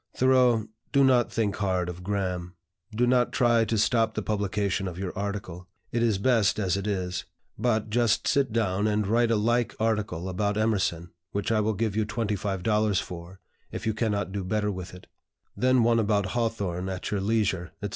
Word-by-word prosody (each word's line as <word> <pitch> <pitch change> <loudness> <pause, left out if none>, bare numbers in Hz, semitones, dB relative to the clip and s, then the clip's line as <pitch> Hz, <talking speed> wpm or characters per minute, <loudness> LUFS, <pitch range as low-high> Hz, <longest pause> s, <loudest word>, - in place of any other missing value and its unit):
"Thoreau, 125 -4 +4 0.3
do 140 - +4
not 125 -3 +4
think 105 -3 -1
hard 95 -3 0
of 90 0 -6
Graham. 90 -2 -3 0.4
Do 115 +3 +1
not 125 0 +3
try 120 -2 +3
to 110 +1 -1
stop 110 0 +2
the 110 - -2
publication 100 -2 -1
of 90 -2 -6
your 95 -1 -4
article. 100 -3 -5 0.2
It 120 - 0
is 115 -4 +2
best 110 -1 +2
as 95 -4 0
it 100 +1 -3
is. 95 -2 -2 0.3
But 110 -3 0
just 115 -1 +2
sit 140 -4 +2
down 105 -2 +1
and 105 0 +1
write 115 +3 +2
a 115 - +3
like 120 +3 +1
article 105 -6 -1
about 100 +3 -1
Emerson, 95 -6 0 0.2
which 100 +2 -1
I 110 - +3
will 105 0 0
give 110 0 -1
you 110 -1 0
$25 105 -1 0
for, 90 +2 -8 0.3
if - - -6
you 110 - +1
cannot 105 -3 -1
do 100 0 -3
better 105 +2 0
with 90 -1 -7
it; 90 - -13 0.5
then 130 -1 +3
one 115 0 +3
about 100 -3 +1
Hawthorne 100 -6 -2
at 95 +1 -4
your 100 -2 0
leisure, 100 -4 0
etc. 100 - -2
105 Hz, 185 wpm, -27 LUFS, 95-115 Hz, 0.5 s, Thoreau